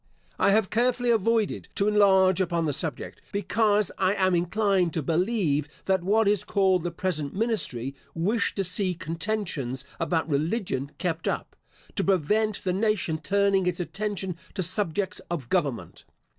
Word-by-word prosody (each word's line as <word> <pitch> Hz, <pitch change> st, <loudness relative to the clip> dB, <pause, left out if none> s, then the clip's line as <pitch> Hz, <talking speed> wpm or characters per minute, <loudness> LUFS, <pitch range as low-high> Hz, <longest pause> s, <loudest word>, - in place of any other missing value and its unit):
I -, -, +4 dB
have 205 Hz, -1 st, +2 dB
carefully 245 Hz, +1 st, +2 dB
avoided 225 Hz, 0 st, +1 dB
to 200 Hz, -, +1 dB
enlarge 190 Hz, -3 st, +4 dB
upon 170 Hz, -2 st, 0 dB
the 150 Hz, -, 0 dB
subject, 160 Hz, +2 st, -2 dB
because 205 Hz, +1 st, +1 dB
I 190 Hz, +1 st, +2 dB
am 185 Hz, -2 st, +2 dB
inclined 180 Hz, 0 st, +1 dB
to 160 Hz, -, -1 dB
believe 165 Hz, -, 0 dB, 0.2 s
that 190 Hz, -1 st, +2 dB
what 210 Hz, +3 st, +3 dB
is 205 Hz, -1 st, +2 dB
called 190 Hz, -3 st, +2 dB
the 175 Hz, -, -2 dB
present 170 Hz, -4 st, -3 dB
ministry, 190 Hz, -, 0 dB, 0.2 s
wish 200 Hz, +7 st, 0 dB
to 195 Hz, -, 0 dB
see 185 Hz, 0 st, 0 dB
contentions 165 Hz, -, -3 dB
about 165 Hz, -1 st, 0 dB
religion 155 Hz, -, -1 dB
kept 165 Hz, -3 st, -2 dB
up, -, -, -3 dB, 0.4 s
to 200 Hz, -, 0 dB
prevent 200 Hz, +4 st, +1 dB
the 185 Hz, -, 0 dB
nation 195 Hz, -5 st, 0 dB
turning 200 Hz, +1 st, +2 dB
its 180 Hz, 0 st, -1 dB
attention 195 Hz, -1 st, -3 dB, 0.2 s
to 190 Hz, -, -1 dB
subjects 190 Hz, +1 st, 0 dB
of 150 Hz, -8 st, -4 dB
government. 145 Hz, -10 st, -2 dB
190 Hz, 150 wpm, -26 LUFS, 165-210 Hz, 0.4 s, I